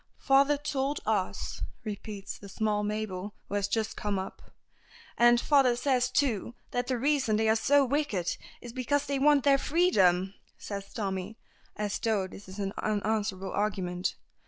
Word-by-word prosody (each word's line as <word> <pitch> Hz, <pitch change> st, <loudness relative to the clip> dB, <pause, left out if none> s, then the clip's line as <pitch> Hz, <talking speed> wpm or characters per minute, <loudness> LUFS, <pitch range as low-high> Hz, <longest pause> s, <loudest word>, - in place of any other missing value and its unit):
"Father 280 Hz, +1 st, +5 dB
told 285 Hz, -1 st, -1 dB
us," -, -, -1 dB, 0.2 s
repeats 205 Hz, -2 st, -6 dB
the 200 Hz, -, -11 dB
small 210 Hz, +1 st, 0 dB
Mabel, 205 Hz, -2 st, -3 dB
who -, -, -8 dB
has 200 Hz, -1 st, +1 dB
just 220 Hz, +1 st, -1 dB
come 205 Hz, -1 st, -2 dB
up. 190 Hz, 0 st, -6 dB, 0.7 s
"And 240 Hz, 0 st, +6 dB
father 270 Hz, -3 st, +4 dB
says, 250 Hz, -1 st, +1 dB
too, 240 Hz, -4 st, 0 dB, 0.2 s
that 245 Hz, 0 st, -1 dB
the 255 Hz, -, 0 dB
reason 270 Hz, -3 st, +2 dB
that 220 Hz, -, +1 dB
they 220 Hz, -, +3 dB
are 220 Hz, -, +5 dB
so 280 Hz, +5 st, +4 dB
wicked 255 Hz, -, 0 dB, 0.3 s
is 240 Hz, -1 st, -9 dB
because 275 Hz, +3 st, 0 dB
they 280 Hz, -1 st, -1 dB
want 290 Hz, -1 st, +5 dB
their 275 Hz, -1 st, +5 dB
freedom!" 195 Hz, -, +3 dB, 0.2 s
says 200 Hz, -1 st, -6 dB
Tommy, 195 Hz, 0 st, -3 dB, 0.4 s
as 210 Hz, -1 st, -2 dB
though 215 Hz, -4 st, +1 dB
this 190 Hz, +1 st, -11 dB
is 190 Hz, -, -9 dB
an 195 Hz, -1 st, -2 dB
unanswerable 210 Hz, -2 st, -1 dB
argument. 190 Hz, -3 st, -1 dB
220 Hz, 160 wpm, -29 LUFS, 200-270 Hz, 0.7 s, And